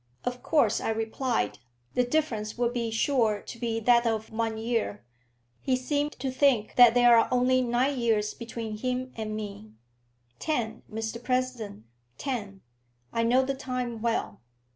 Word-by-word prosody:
"Of 245 0 -3
course," 265 -10 +2
I - - -1
replied, 225 - -1 0.3
"the 250 - +3
difference 240 -6 -1
would 240 0 +1
be 235 -2 -1
sure 225 -2 +1
to 235 - -10
be 230 -1 -1
that 235 +1 +4
of 220 0 -2
one 225 0 -1
year. 225 -2 -2 0.6
He 260 - +1
seems 290 +3 -1
to 260 +1 -3
think 260 -5 +2
that 245 -2 +8
there 245 -1 +7
are 230 - +5
only 255 +1 +3
nine 250 +3 +1
years 220 -3 +1
between 230 -2 -6
him 255 +1 -2
and 215 -1 -4
me." 200 - -7 0.7
"Ten, 235 -7 -2
Mr 225 +2 -4
President; 250 - -2 0.3
ten. 210 -8 -4 0.5
I 230 - +1
know 245 +3 +4
the 275 +1 -1
time 250 -3 -4
well." 230 0 -1
235 Hz, 155 wpm, -28 LUFS, 220-255 Hz, 0.7 s, that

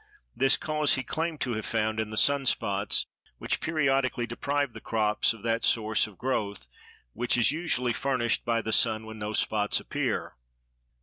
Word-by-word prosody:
This 135 +1 +4
cause 150 -1 +1
he 130 - -3
claimed 160 +1 -3
to 125 - -1
have 110 0 -4
found 110 -1 -1
in 110 -1 -2
the 110 - -5
sun 140 +3 +3
spots, 100 -4 +1 0.3
which - - -2
periodically 135 -6 +1
deprive 140 +2 -2
the - - -10
crops 105 -2 +1
of 115 -3 -9
that 115 0 0
source 110 -1 +2
of 100 -4 -15
growth 100 - -2 0.5
which 120 +2 +1
is 120 +1 +4
usually 145 -7 -1
furnished 125 -3 0
by 115 -1 0
the 110 - -3
sun 110 -1 +3
when 110 0 -9
no 105 0 -4
spots 105 -1 +1
appear. - - -3
115 Hz, 175 wpm, -28 LUFS, 110-135 Hz, 0.5 s, This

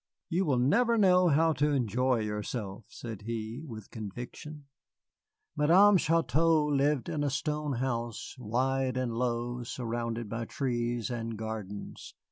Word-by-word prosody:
"You 185 +2 +1
will 140 -5 +2
never 230 - +3
know 185 -3 +5
how 160 +1 +4
to 145 +2 +1
enjoy 125 -1 +1
yourself," 105 0 -4
said 115 -4 -8
he, 115 +3 -4
with 110 -9 -9
conviction. 120 +7 -8 0.9
Madame 185 +7 +6
Chouteau 165 -1 +3
lived 145 -1 +1
in 155 -3 -1
a 145 - +1
stone 150 +1 -2
house, 120 -2 -3
wide 130 +3 0
and 125 -2 -1
low, 120 0 -1
surrounded 115 -1 -3
by 115 +2 -3
trees 120 -2 -2
and 115 -2 -4
gardens. 105 -2 -6
125 Hz, 130 wpm, -30 LUFS, 115-150 Hz, 0.9 s, Madame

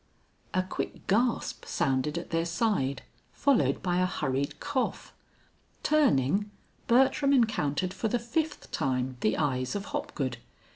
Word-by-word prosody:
A 185 - +3
quick 185 - -5
gasp 235 +4 +1
sounded 135 +4 0
at 170 - -6
their 165 0 +1
side, 170 - 0 0.3
followed 280 -3 +2
by 180 -1 +1
a 185 - +3
hurried 140 -5 -2
cough. 260 -2 -2 0.7
Turning, 205 - +3 0.4
Bertram 270 +3 +4
encountered 185 - +1
for 210 +3 -1
the 245 - +1
fifth 295 +7 -3
time 130 -3 -1
the 110 - +1
eyes 130 -3 0
of 200 0 -3
Hopgood. 130 -5 -2
185 Hz, 130 wpm, -29 LUFS, -, 0.7 s, Bertram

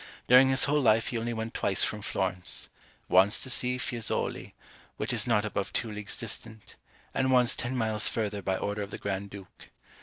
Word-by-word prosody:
During 130 +2 +7
his 130 0 +5
whole 150 +1 +2
life 115 -3 +3
he 120 - -2
only 115 +1 -3
went 110 0 -4
twice 95 -2 +1
from 105 - -2
Florence; 95 -2 -2 0.4
once 95 +4 +4
to 130 - -2
see 125 +1 0
Fiesoli, 120 -2 -2 0.4
which - - -2
is - - +1
not 105 -3 +2
above 100 -2 -3
two 115 - -2
leagues 105 -1 -4
distant, 110 -1 -6 0.4
and 130 0 +1
once 125 0 +4
ten 130 +1 -3
miles 110 -2 +2
further 105 -3 -3
by 95 0 -1
order 105 +1 -3
of 100 - -5
the - - -7
Grand 100 0 -4
Duke. 100 -2 -13
110 Hz, 190 wpm, -28 LUFS, 100-120 Hz, 0.4 s, During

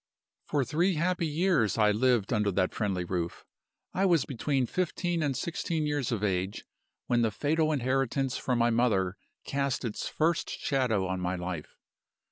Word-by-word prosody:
"For 140 -3 +1
three 170 +8 +1
happy 170 +1 0
years 155 - +2
I 105 -1 +5
lived 120 -1 +2
under 105 -2 +2
that 95 0 +1
friendly 95 -5 -1
roof. 85 -1 -3 0.5
I 190 - +1
was 170 -6 +3
between 135 0 0
fifteen 175 +2 -1
and 140 -4 0
sixteen 165 0 -2
years 145 -4 -1
of 110 -3 -1
age, 95 -1 -1 0.4
when 120 -1 +2
the 115 - +3
fatal 155 +7 +1
inheritance 135 -1 0
from 125 -2 0
my 120 0 +3
mother 105 -6 +2 0.3
cast 140 -2 -1
its 110 - -3
first 160 +1 0
shadow 125 -8 0
on 95 0 -2
my 90 0 -1
life. 90 -3 -5
125 Hz, 160 wpm, -29 LUFS, 105-150 Hz, 0.5 s, I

